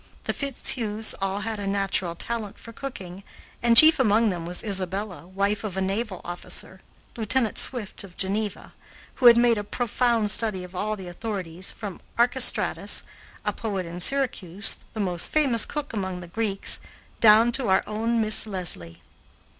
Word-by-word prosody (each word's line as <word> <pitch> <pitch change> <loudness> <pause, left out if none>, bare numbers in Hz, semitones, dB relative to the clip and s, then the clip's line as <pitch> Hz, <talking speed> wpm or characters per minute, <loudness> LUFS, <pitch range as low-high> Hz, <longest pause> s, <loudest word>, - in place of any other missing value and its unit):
The - - -2
Fitzhughs 230 -5 -2
all 195 +1 -1
had 220 0 -4
a 200 - -4
natural 195 -3 -1
talent 220 +1 -3
for 230 - -12
cooking, 195 -9 -8 0.4
and 235 -1 +4
chief 315 +3 +10
among 220 -2 +3
them 170 -2 -5
was 175 +1 -2
Isabella, 190 -2 -2
wife 200 +2 -1
of 195 -3 -5
a - - +1
naval 195 +1 -3
officer, 175 +2 -7 0.4
Lieutenant 225 0 0
Swift 230 -8 -3
of 185 -3 -14
Geneva, 205 +1 -3 0.4
who 250 - +5
had 235 -1 +9
made 235 -2 +3
a - - -4
profound 230 -1 0
study 210 -4 +1
of 180 0 -11
all 215 +3 -2
the 190 -3 -9
authorities 185 -2 -5
from 205 -5 -8 0.2
Archestratus, 245 +2 +3 0.4
a - - 0
poet 200 -5 -4
in 170 +1 -7
Syracuse, 205 -5 -2 0.2
the 220 - -6
most 180 -4 0
famous 270 -8 +3
cook 295 -3 -5
among 190 -4 -4
the 175 - -10
Greeks, 200 +1 +1 0.4
down 225 +2 +6
to 250 -1 +1
our 190 - +3
own 225 +2 -1
Miss 215 0 +4
Leslie. 170 - -5
210 Hz, 160 wpm, -25 LUFS, 190-230 Hz, 0.4 s, chief